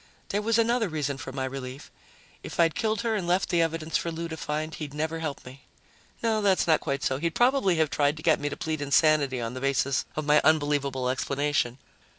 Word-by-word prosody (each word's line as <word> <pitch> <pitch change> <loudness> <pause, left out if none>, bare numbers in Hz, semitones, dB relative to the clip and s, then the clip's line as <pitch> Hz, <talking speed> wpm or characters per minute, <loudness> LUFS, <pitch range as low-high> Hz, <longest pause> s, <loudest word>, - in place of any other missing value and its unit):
There 205 - 0
was 225 +1 +1
another 230 -2 +2
reason 145 -3 -2
for 130 - -6
my 130 0 -3
relief 130 +1 -7 0.5
if - - -8
I'd 165 -2 +4
killed 220 -1 -1
her 230 -1 0
and 195 -5 -2
left 180 +2 +1
the 170 -1 +2
evidence 165 -1 0
for 170 - -3
Lou 165 +1 -4
to 160 - -4
find, 155 +1 -3
he'd 150 -2 -7
never 160 +2 -2
help 155 -4 -5
me. 130 +2 -11 0.6
No, 220 -2 +1
that's 195 -2 +3
not 160 -2 +4
quite 140 +1 -2
so; 130 - 0
he'd 165 +1 -2
probably 245 -7 +3
have 160 -2 +1
tried 145 +1 +1
to 155 - -9
get 160 -2 +3
me 145 - -2
to 145 - -6
plead 155 -2 -3
insanity 145 -2 +3
on 115 0 -4
the 130 - -6
basis 140 0 +1
of 155 - -3
my 150 +1 +5
unbelievable 145 -4 +1
explanation. 135 -1 0
155 Hz, 220 wpm, -27 LUFS, 140-170 Hz, 0.6 s, my